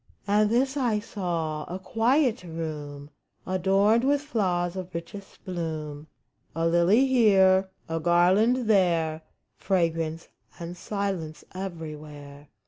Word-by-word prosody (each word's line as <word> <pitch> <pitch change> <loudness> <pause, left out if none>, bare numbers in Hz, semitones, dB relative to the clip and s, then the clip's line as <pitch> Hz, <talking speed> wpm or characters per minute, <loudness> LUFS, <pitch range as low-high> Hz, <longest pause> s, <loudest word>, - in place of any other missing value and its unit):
And 210 +1 +3
this 265 +5 +1
I 240 -6 +1
saw: 170 -7 -3
a 180 - -5
quiet 235 +6 +1
room 150 -4 -6 0.3
Adorned 195 +5 +2
with 285 +1 +2
flowers 185 - -1
of 185 -2 -7
richest 195 +4 -9
bloom 155 -4 -5 0.2
— - - -40
A 165 0 0
lily 175 +9 +4
here, 195 -7 +4 0.2
a 165 0 -2
garland 190 +9 +3
there 170 -6 +2 0.2
— - - -51
Fragrance 165 -3 0 0.3
and 170 +1 -6
silence 190 -5 -4
everywhere. 150 -5 -8
180 Hz, 120 wpm, -26 LUFS, 160-210 Hz, 0.3 s, lily